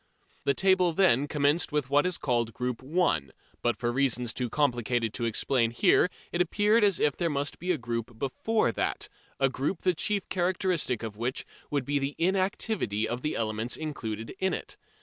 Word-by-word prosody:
The 140 - +2
table 190 -3 +3
then 155 -7 +4
commenced 145 +3 +1
with 145 -3 -1
what 145 +4 +4
is 180 - +1
still - - -6
called 120 -4 0
Group 125 -1 -3
1, 140 - 0 0.3
but 120 -1 +1
for 120 -1 -1
reasons 125 -3 +1
too 125 -2 -2
complicated 120 -4 0
to 120 - -2
explain 115 +1 +1
here 180 - +4 0.2
it 175 - +1
appeared 210 +5 +3
as 200 -4 +3
if 145 -2 +2
there 170 -2 0
must 145 -1 -2
be 180 +2 -1
a 175 - +1
group 115 -2 -4
before 140 - 0
that, - - -2 0.3
a 135 - +4
group 140 +7 -3
the 185 - +3
chief 200 +3 -1
characteristic 180 - 0
of 110 -2 -6
which 120 +3 -2 0.2
would 140 -3 -1
be 145 +1 0
the 140 +1 -3
inactivity 185 - 0
of 120 +1 -3
the 150 - -2
elements 110 +1 -2
included 115 -8 -5
in 190 0 +1
it. - - -7
140 Hz, 190 wpm, -28 LUFS, 120-180 Hz, 0.3 s, then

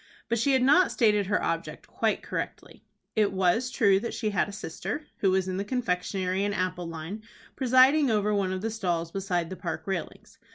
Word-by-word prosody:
But 235 0 +1
she 275 +5 +2
had 260 -1 +3
not 295 +8 +5
stated 210 -4 +2
her 210 - 0
object 165 0 -3
quite - - -1
correctly. - - -6 0.3
It 210 -2 +3
was 190 +6 +1
true 200 -7 +3
that 235 - -5
she 215 -2 -1
had 205 - 0
a - - -6
sister, 200 - -5
who 195 - +2
was 190 0 +1
in 185 0 -2
the 200 - -1
confectionery 190 -4 -1
and 205 0 -1
apple 180 -1 -2
line, 165 +6 -6 0.3
presiding 260 +3 +5
over 210 -1 +1
one 195 -2 0
of 185 0 -3
the 225 +1 -2
stalls 175 -6 -2
beside 180 -3 -2
the - - -4
Park 165 -2 -5
railings. 190 -4 -5
200 Hz, 200 wpm, -27 LUFS, 185-225 Hz, 0.3 s, not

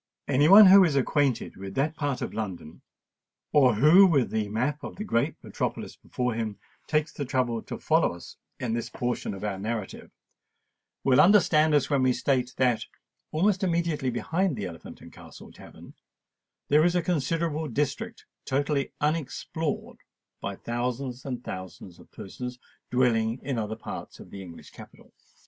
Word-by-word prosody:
Any 145 +2 +3
one 205 +2 +10
who 195 +1 +9
is 160 -6 +1
acquainted 135 -2 0
with 95 0 -8
that 155 +4 0
part 145 -4 -2
of - - -5
London, 95 -8 -6 0.7
or 130 -6 +5
who, 160 - +7
with 140 -8 +2
the 110 -2 -1
map 130 +8 -1
of - - -7
the 210 - -5
great 120 - 0
metropolis - - -4
before 125 -1 -3
him, 110 -2 -3 0.3
takes 150 0 0
the 145 - -4
trouble 125 -3 -1
to - - -7
follow - - +1
us 85 - -12 0.2
in 115 -3 -2
this 115 0 -3
portion 120 -5 -3
of 95 - -9
our 100 -3 -3
narrative, 110 -1 -5 0.9
will 135 +1 +5
understand 160 -5 +5
us 145 0 +1
when 140 -2 +2
we 130 -1 +3
state 125 0 -1
that, 125 -4 +1 0.5
almost 195 +4 +1
immediately 165 -6 0
behind 160 - -1
the 105 -4 -4
Elephant 85 -3 -10
and - - -13
Castle - - -13
tavern, - - -14 0.7
there 150 +2 +4
is 175 +1 +2
a 175 - +1
considerable 160 -1 -1
district 145 -1 -3 0.2
totally 140 +1 -1
unexplored 155 +1 -2 0.4
by 100 - -4
thousands 125 +3 -4
and 125 -2 -5
thousands 95 -1 -8
of - - -18
persons 125 +4 -7 0.3
dwelling 115 -2 +1
in 130 -3 -2
other 110 0 -3
parts 115 - -8
of - - -13
the 100 - -8
English 85 -3 -12
capital. - - -15
130 Hz, 160 wpm, -27 LUFS, 115-155 Hz, 0.9 s, one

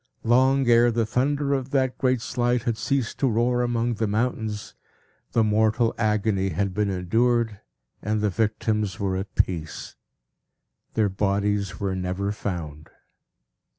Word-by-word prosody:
Long 130 +3 +3
ere 120 0 +5
the 115 -1 0
thunder 140 +5 0
of 135 -1 -2
that 130 -2 0
great 130 -2 +1
Slide 120 -1 0
had 115 -2 0
ceased 115 +2 -2
to 135 - +2
roar 120 +2 +1
among 120 -1 0
the 110 0 -1
mountains, 110 -1 -2 0.6
the 115 - +4
mortal 110 +2 +2
agony 105 -3 +1
had 95 +3 -1
been 105 +1 0
endured, 110 +4 +1 0.4
and 110 0 -1
the 105 -1 +1
victims 105 0 -1
were 95 -2 -1
at 95 0 -5
peace. 80 -4 -2 1.0
Their 110 -2 +2
bodies 100 -1 -1
were 95 -2 -1
never 95 +2 -2
found. 80 -7 -5
110 Hz, 140 wpm, -25 LUFS, 100-120 Hz, 1.0 s, ere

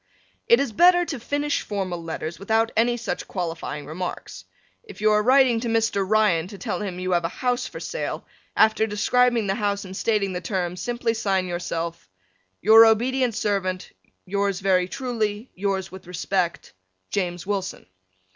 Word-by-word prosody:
It 470 0 +6
is 275 -4 0
better 350 +8 +5
to 280 -6 -5
finish 290 +4 -1
formal 185 -4 -4
letters 165 0 -5
without 225 +3 +1
any 240 +2 +2
such 230 - -4
qualifying 165 -5 -4
remarks. 175 +5 -6 0.4
If 455 - -12
you 215 +1 +3
are 210 0 +4
writing 255 0 +4
to 235 - -3
Mr. 225 -3 +1
Ryan 210 -6 +3
to 200 - -10
tell 215 +1 -3
him 195 -3 -4
that 180 - -6
you 185 - -1
have 175 -1 +2
a 165 - -1
house 250 +4 -1
for - - -8
sale, - - -4 0.3
after 220 0 +4
describing 235 +2 +2
the 195 - 0
house 200 -1 -1
and 185 0 -8
stating 200 -2 0
the 180 - -4
terms 180 -1 -3
simply 240 -2 -1
sign 195 -4 0
yourself 170 - -4 0.5
Your 225 +3 +9
obedient 245 +2 +2
Servant 185 -3 -2 0.3
Yours 200 0 -1
very 185 -2 +2
truly, 220 -1 -3
Yours 195 0 -2
with 190 -1 -11
respect, 180 0 -2 0.4
James 175 -3 -2
Wilson. 195 -2 -3
205 Hz, 165 wpm, -24 LUFS, 185-230 Hz, 0.5 s, Your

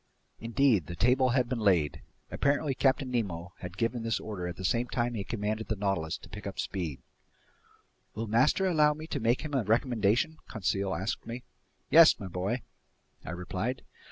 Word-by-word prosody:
Indeed, 115 - +2
the 85 - -6
table 125 +8 +3
had 125 0 +2
been 125 -1 -2
laid. 90 -8 +2 0.3
Apparently 140 +1 +1
Captain 135 0 +1
Nemo 95 -7 -2
had 90 0 -8
given 115 +1 0
this 115 0 -1
order 95 -5 -5
at 90 - -5
the 95 - -6
same 120 +5 +1
time 120 0 -1
he 105 -4 -3
commanded 110 +1 -3
the 110 - -1
Nautilus 95 -5 -1
to - - -14
pick 105 -1 -7
up 100 - -6
speed. 85 -8 -4 1.1
"Will 110 +2 -3
master 125 - +3
allow 150 -5 +4
me 155 +1 -8
to 155 -3 -3
make 120 +1 +2
him 155 -2 -6
a 135 -4 +2
recommendation?" 115 - +1
Conseil 95 -2 -1
asked 95 +7 -3
me. 120 +2 -6 0.5
"Yes, 165 0 +8
my 100 - -6
boy," 95 +7 -2 0.6
I - - -8
replied. 90 +8 -3
115 Hz, 180 wpm, -30 LUFS, 95-130 Hz, 1.1 s, Yes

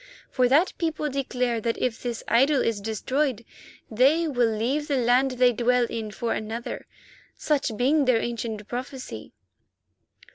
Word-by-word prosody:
For 250 -2 +2
that 310 +8 +3
people 310 -3 -1
declare 250 -3 -1
that 230 +1 -1
if 245 -3 -2
this 240 -2 -4
idol 270 +4 +4
is 220 -3 -1
destroyed 235 +3 -1 0.5
they 280 +9 +3
will 245 -5 +2
leave 250 +8 -1
the 280 - 0
land 250 +2 +3
they 250 -1 +4
dwell 245 +1 +2
in 225 -2 -5
for 230 +2 -2
another, 225 +2 -5 0.5
such 275 -7 -1
being 280 +4 +3
their 250 -3 +3
ancient 225 -3 -4
prophecy." 250 - -6
245 Hz, 145 wpm, -25 LUFS, 230-275 Hz, 0.5 s, idol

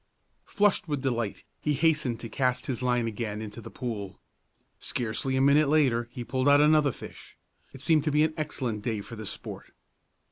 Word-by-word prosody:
Flushed 205 -3 +2
with 145 -3 -2
delight, 120 -5 -2 0.2
he 150 - 0
hastened 150 -7 +1
to 115 - -5
cast 125 +2 0
his 130 -3 -3
line 125 -2 +1
again 105 -1 -3
into 110 +1 -7
the - - -9
pool. 105 -6 -5 0.6
Scarcely 120 +3 -2
a 130 - +2
minute 140 +2 +5
later 130 -6 +2
he 125 -2 -6
pulled 130 +3 +1
out 145 0 +7
another 150 -1 +5
fish. - - -12 0.3
It 135 - -11
seemed 155 0 +3
to 155 - +1
be 150 +1 +4
an 160 0 +1
excellent 130 -8 -3
day 110 -2 -2
for 115 - -9
the 110 -2 -7
sport. - - -8
130 Hz, 185 wpm, -28 LUFS, 115-150 Hz, 0.6 s, out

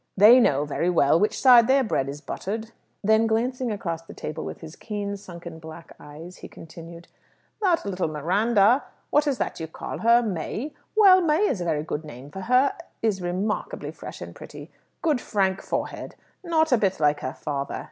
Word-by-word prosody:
They 220 +6 +8
know 145 - +2
very 160 +4 -1
well 165 -2 +3
which 210 - 0
side 245 -3 +7
their 270 +1 +4
bread 140 - -1
is 145 +1 -7
buttered." 220 +7 -5 0.3
Then 220 +2 +3
glancing 245 +2 -1
across 170 -5 -4
the 165 - -13
table 155 +1 -6
with - - -7
his 160 0 -10
keen, 205 -2 -5
sunken, 170 -4 -10
black 160 +1 -12
eyes, 155 +5 -11
he - - -10
continued, 165 +1 -12 0.5
"That 360 - +2
little 185 -3 -2
Miranda 200 - +2 0.3
what 295 +1 +3
is 275 -3 0
it - - -3
you 160 - -4
call 160 - -7
her? 235 +1 +4
May? 215 - -4 0.2
Well, 385 -4 +7
May 335 +5 +2
is 185 - -2
a - - -3
very 155 -3 -1
good 155 0 -4
name 140 -1 -11
for 190 - -7
her 255 +6 +3 0.3
is 210 -4 0
remarkably 200 - -3
fresh - - -10
and - - -8
pretty. - - -11 0.3
Good 300 -7 +1
frank 195 -2 0
forehead. - - -4 0.3
Not 320 -3 +1
a 250 - +4
bit 195 -3 0
like 150 -1 +2
her 130 - -4
father. 140 -2 -4
200 Hz, 190 wpm, -24 LUFS, 160-240 Hz, 0.5 s, They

